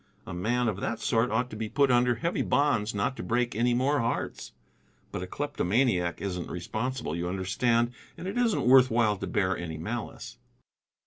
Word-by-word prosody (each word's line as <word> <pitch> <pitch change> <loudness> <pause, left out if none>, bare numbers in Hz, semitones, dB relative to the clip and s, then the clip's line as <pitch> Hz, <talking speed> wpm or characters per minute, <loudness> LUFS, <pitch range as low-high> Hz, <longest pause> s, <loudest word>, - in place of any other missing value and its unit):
A - - -7
man 120 +7 0
of 100 -3 -1
that 110 +2 -2
sort 115 +1 +1
ought 125 +3 0
to - - -6
be 110 0 -4
put 140 +2 +3
under 120 0 +4
heavy 165 +10 -1
bonds 120 -7 +1
not 100 +6 0
to - - -4
break 120 0 0
any 120 +2 +2
more 140 +4 +2
hearts. 115 0 -2 0.6
But - - -4
a 90 - -5
kleptomaniac 115 - 0
isn't 90 -3 -4
responsible, 110 - -3
you 85 +1 -2
understand. 115 +6 +1 0.3
And 185 - -6
it 195 - -4
isn't 240 - +1
worth 130 0 +7
while 110 -2 +2
to - - -5
bear 95 -1 +1
any 80 -2 -5
malice." 110 +8 -6
115 Hz, 185 wpm, -28 LUFS, 100-125 Hz, 0.6 s, worth